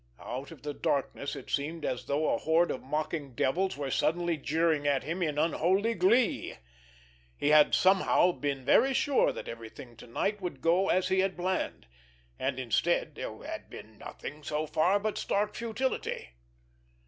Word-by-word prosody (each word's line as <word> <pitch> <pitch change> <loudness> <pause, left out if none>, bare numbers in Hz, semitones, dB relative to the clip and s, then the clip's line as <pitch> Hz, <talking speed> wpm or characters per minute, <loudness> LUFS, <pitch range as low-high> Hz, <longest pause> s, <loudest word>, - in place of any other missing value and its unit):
Out 130 +3 -6
of 155 -5 -13
the 150 0 -3
darkness 140 -1 -2
it - - -9
seemed 155 +3 -2
as 125 - -3
though 150 +2 +1
a - - 0
horde 165 +2 +2
of - - -4
mocking 150 -1 -3
devils 185 +10 0
were 140 -2 -3
suddenly 170 +4 +1
jeering 155 0 +1
at 140 -2 +2
him 170 +4 -3
in 150 -4 -1
unholy 185 +8 +2
glee. 215 +5 +2 0.8
He 145 - +1
had 150 -1 +6
somehow 185 -1 +4
been 140 -5 -3
very 270 - +4
sure 285 +1 +3
that - - -7
everything 115 +1 -9
to - - -12
night 200 - -1
would 180 -2 -5
go 175 +4 +2
as 185 0 +2
he 190 0 +2
had 190 -1 0
planned, 185 +1 -2 0.5
and, 130 0 -1
instead, 125 -4 0
there - - -7
had - - -7
been - - -12
nothing 150 +2 -8
so 150 +1 -2
far 175 +6 +2
but 215 +1 -2
stark 210 +1 0
futility. 235 - -3
160 Hz, 170 wpm, -30 LUFS, 145-190 Hz, 0.8 s, had